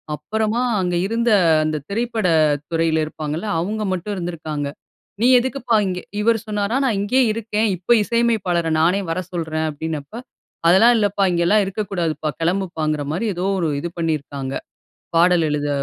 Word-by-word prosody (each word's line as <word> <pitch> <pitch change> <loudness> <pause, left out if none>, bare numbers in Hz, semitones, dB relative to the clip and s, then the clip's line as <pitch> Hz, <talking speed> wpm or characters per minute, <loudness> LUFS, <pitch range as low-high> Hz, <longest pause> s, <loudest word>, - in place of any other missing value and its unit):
அப்புறமா, 220 +7 -1 0.2
அங்க 180 -1 -1
இருந்த 230 +2 0 0.3
அந்த 155 0 -1
திரைப்பட 225 -1 -1 0.4
துறைல 165 -1 +1
இருப்பாங்கல்ல, 155 +4 -5
அவுங்க 210 +5 -2
மட்டும் 185 +3 -3
இருந்திருக்காங்க. 155 -5 -4 0.5
"நீ 240 - +4
எதுக்குப்பா 250 -2 -1
இங்க" 180 -1 -2 0.2
இவரு 225 +1 +3
சொன்னாராம். 210 +5 0
"நான் 225 -6 +1
இங்கயே 255 +6 +2
இருக்கேன். 220 0 -1
இப்ப 185 +7 +3
இசையமைப்பாளர 215 -8 +1
நானே 180 +5 +3
வர 165 +2 -1
சொல்றேன்" 160 -2 -2
அப்படீன்னப்ப, 155 - -6 0.5
"அதெல்லாம் 225 +8 +6
இல்லப்பா. 205 -2 +1
இங்கலாம் 175 +5 +3
இருக்கக்கூடாதுப்பா" 175 -7 -2
கெளம்புப்பாங்கிற 165 -4 -1
மாரி 195 +8 -1
ஏதோ 180 +2 -2
ஒரு 165 -3 0
இது 170 - -3
பண்ணிருக்காங்க, 145 -4 -3 0.6
பாடல் 175 -1 +4
எழுத 145 0 -1
180 Hz, 135 wpm, -21 LUFS, 160-220 Hz, 0.6 s, அதெல்லாம்